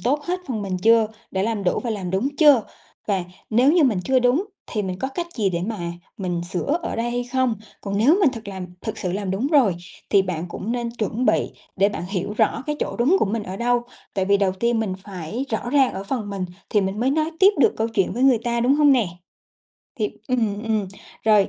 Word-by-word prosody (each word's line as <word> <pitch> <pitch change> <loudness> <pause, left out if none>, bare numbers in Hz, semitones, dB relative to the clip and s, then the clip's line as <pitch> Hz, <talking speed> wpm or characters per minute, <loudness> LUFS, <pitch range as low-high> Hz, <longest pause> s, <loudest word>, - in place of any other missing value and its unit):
tốt 290 +5 0
hết 360 +1 -2
phần 220 -5 -2
mình 190 -2 -2
chưa, 225 +2 +5 0.2
đã 190 0 -1
làm 220 -2 -1
đủ 180 - +2
và 235 - -1
làm 190 -5 -3
đúng 200 +9 +1
chưa? 290 -8 +6 0.4
Và 195 -4 0 0.3
nếu 250 +7 +5
như 340 -4 +5
mình 215 -8 +2
chưa 265 -1 +3
đúng 250 +9 +2 0.2
thì 215 - -2
mình 185 -1 -4
có 265 - -2
cách 340 +6 -4
gì 205 -5 +1
để 170 -1 -2
mà 220 -3 -3 0.4
mình 180 -3 -2
sửa 285 - 0
ở - - -3
đây 235 +1 -1
hay 245 0 -1
không? 255 -2 +1 0.3
Còn 200 0 -2
nếu 285 - +5
mình 320 -9 +5
thực 225 -4 -8
làm 190 -2 -5
thực - - -5
sự 180 -1 -2
làm 195 -1 -2
đúng 200 +8 0
rồi 270 - +4 0.3
thì 200 -2 +5
bạn 175 -2 -3
cũng 210 +6 -4
nên 240 -1 -2
chuẩn 230 +1 -2
bị - - +2 0.3
để 200 +1 +4
bạn 190 - -5
hiểu 200 +1 -2
rõ - - +2
cái 300 - -1
chỗ - - -2
đúng 275 +11 +4
của - - +3
mình 210 +2 -2
ở 190 -1 -6
đâu. 240 +1 +1 0.3
Tại 190 -2 +1
vì 200 +1 +4
đầu 195 -2 +1
tiên 230 +4 0
mình 200 -4 -2
phải 200 +5 -5
rõ 235 +2 -2
ràng 270 -2 +4
ở 195 - -5
phần 215 -2 -3
mình 195 -2 -3 0.3
thì 210 - +3
mình 195 +2 -2
mới 260 +3 +2
nói 310 +2 +1
tiếp 390 - +8
được 430 - +4
câu 225 +1 0
chuyện 210 -5 0
với 245 - -2
người 265 -3 +5
ta, 235 0 0
đúng 255 +4 +4
hông 295 -1 +5
nè? 240 -7 +3 0.9
Thì 210 - 0 0.2
ừm, 220 -4 0
ừm, 215 -3 -1 0.4
rồi 210 -3 +5
225 Hz, 245 wpm, -23 LUFS, 195-255 Hz, 0.9 s, tiếp